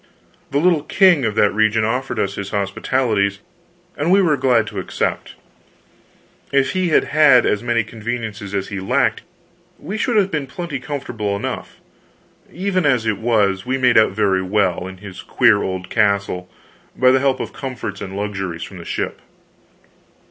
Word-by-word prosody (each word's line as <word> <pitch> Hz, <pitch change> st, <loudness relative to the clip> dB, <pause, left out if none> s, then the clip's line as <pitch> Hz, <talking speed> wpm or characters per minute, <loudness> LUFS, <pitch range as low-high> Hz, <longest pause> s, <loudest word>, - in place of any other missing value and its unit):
The 140 Hz, -, -1 dB
little 165 Hz, 0 st, +3 dB
king 175 Hz, -, +3 dB
of 110 Hz, -2 st, -1 dB
that 105 Hz, -2 st, +3 dB
region 110 Hz, +1 st, +2 dB
offered 125 Hz, +5 st, -2 dB
us 100 Hz, 0 st, -1 dB
his 100 Hz, -1 st, -5 dB
hospitalities, 100 Hz, 0 st, 0 dB, 0.6 s
and 150 Hz, +4 st, -1 dB
we 195 Hz, -, +6 dB
were 170 Hz, -6 st, +3 dB
glad 125 Hz, -5 st, +2 dB
to -, -, -5 dB
accept. -, -, -3 dB, 1.2 s
If 135 Hz, -1 st, +2 dB
he 185 Hz, -1 st, 0 dB
had 155 Hz, -, +4 dB
had 145 Hz, -5 st, +5 dB
as 105 Hz, -, +1 dB
many 120 Hz, -1 st, +1 dB
conveniences 110 Hz, -2 st, -5 dB
as 100 Hz, -1 st, -2 dB
he 100 Hz, -2 st, -4 dB
lacked, 95 Hz, -, +1 dB, 0.6 s
we 195 Hz, +8 st, -6 dB
should 240 Hz, 0 st, +1 dB
have 195 Hz, -2 st, +2 dB
been 150 Hz, -3 st, -2 dB
plenty 145 Hz, 0 st, -5 dB
comfortable 115 Hz, -7 st, -4 dB
enough; 100 Hz, -, -5 dB, 0.8 s
even 185 Hz, 0 st, -1 dB
as 130 Hz, -6 st, +2 dB
it 110 Hz, -3 st, -1 dB
was, 105 Hz, -4 st, +1 dB
we 130 Hz, +1 st, -1 dB
made 125 Hz, -2 st, +3 dB
out 110 Hz, -3 st, +5 dB
very 95 Hz, -2 st, +1 dB
well, 95 Hz, -2 st, 0 dB
in 95 Hz, 0 st, -9 dB
his 95 Hz, -1 st, -10 dB
queer 100 Hz, -, +3 dB
old 95 Hz, -1 st, -4 dB
castle, 100 Hz, -4 st, 0 dB, 0.5 s
by 130 Hz, 0 st, +5 dB
the 130 Hz, -, +4 dB
help 135 Hz, -1 st, +1 dB
of -, -, -5 dB
comforts 120 Hz, -7 st, -6 dB
and 95 Hz, 0 st, -6 dB
luxuries 95 Hz, -5 st, -4 dB
from 95 Hz, -, -9 dB
the 85 Hz, -, -10 dB
ship. -, -, -4 dB
110 Hz, 170 wpm, -19 LUFS, 100-140 Hz, 1.2 s, we